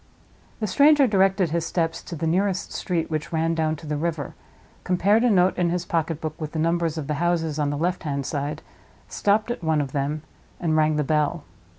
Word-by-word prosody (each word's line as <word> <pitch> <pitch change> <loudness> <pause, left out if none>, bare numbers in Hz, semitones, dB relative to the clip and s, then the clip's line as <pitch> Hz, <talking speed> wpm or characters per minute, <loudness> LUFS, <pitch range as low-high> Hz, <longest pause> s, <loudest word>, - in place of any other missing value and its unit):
The 220 - -1
stranger 285 +7 +5
directed 195 -5 +2
his 170 0 0
steps 165 -1 -1
to 175 - -8
the 165 +1 -3
nearest 185 +3 0
street 170 -3 -2
which 155 -1 -3
ran 165 0 +1
down 160 -1 0
to 160 - -12
the 150 0 -2
river, 155 -3 -3 0.5
compared 200 +5 +3
a 245 - +4
note 185 -3 +4
in 175 -1 +2
his 175 0 -2
pocketbook 160 -1 -2
with 155 -1 -5
the - - -3
numbers 165 0 0
of 155 - -3
the 150 - -2
houses 165 -3 0
on 145 -1 +1
the 145 - -2
left 175 +4 -1
hand 140 -4 -3
side, 145 +2 -3 0.4
stopped 210 +3 +1
at 240 - -5
one 160 -1 +2
of 140 -3 -2
them, 145 +2 -2 0.4
and 160 -3 0
rang 155 0 +3
the 150 - +1
bell. 150 +2 0
165 Hz, 210 wpm, -24 LUFS, 155-180 Hz, 0.5 s, stranger